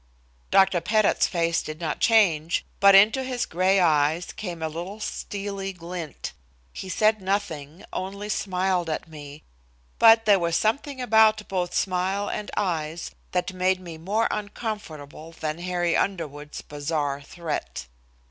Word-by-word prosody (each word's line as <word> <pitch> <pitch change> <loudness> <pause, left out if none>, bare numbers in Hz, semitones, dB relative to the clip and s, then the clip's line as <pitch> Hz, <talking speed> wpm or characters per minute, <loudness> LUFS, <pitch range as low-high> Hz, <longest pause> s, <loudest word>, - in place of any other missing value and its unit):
Dr. 190 -2 +4
Pettit's 215 +2 +2
face 170 -1 0
did 155 0 -7
not 160 -3 -3
change, 175 -8 +3
but 200 0 +7
into 220 +7 +6
his 255 -1 -2
gray 185 +3 +2
eyes 160 0 +2
came 175 -6 -6
a - - 0
little 175 +7 -6
steely 200 -2 -4
glint. 170 -2 -7 0.4
He 185 - -7
said 215 +3 +2
nothing, 175 -5 -3
only 200 +2 -4
smiled 185 -3 0
at 155 - -3
me. 150 -1 -11 0.6
But 225 0 +7
there 205 -2 +5
was 170 -1 0
something 265 +7 0
about 220 -3 +4
both 180 -2 -2
smile 190 +2 0
and 210 - -4
eyes 165 -4 -2 0.2
that 180 +1 -1
made 185 0 +1
me 170 -3 -9
more 205 +7 +1
uncomfortable 170 -8 -6
than 155 0 -4
Harry 175 -1 0
Underwood's 150 -6 -3
bizarre 145 -1 -2
threat. 160 - -5
180 Hz, 140 wpm, -25 LUFS, 160-205 Hz, 0.6 s, but